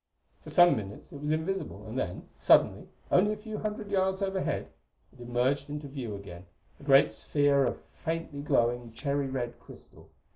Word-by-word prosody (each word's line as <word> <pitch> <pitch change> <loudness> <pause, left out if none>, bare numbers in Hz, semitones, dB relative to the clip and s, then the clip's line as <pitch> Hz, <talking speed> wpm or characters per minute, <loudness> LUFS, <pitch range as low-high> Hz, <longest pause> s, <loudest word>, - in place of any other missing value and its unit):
For - - -11
some 175 -4 +6
minutes 100 -3 -7
it 140 - -9
was 150 - -3
invisible; 160 - -2
and 110 +2 -7
then, 90 -9 -3
suddenly, - - +4 0.2
only 205 +4 +4
a - - -6
few 215 0 -6
hundred 210 -1 -4
yards 190 0 +1
overhead, 190 -1 -1 0.4
it - - -16
emerged 125 +4 0
into 150 0 -5
view 130 -6 -5
again, 90 -2 -10 0.3
a - - -15
great 140 -1 +6
sphere 145 -2 +2
of - - -4 0.2
faintly 165 -3 -3
glowing, 120 -4 +1
cherry 140 +2 -1
red 125 -3 -4
crystal. - - -15
140 Hz, 170 wpm, -29 LUFS, 120-175 Hz, 0.4 s, some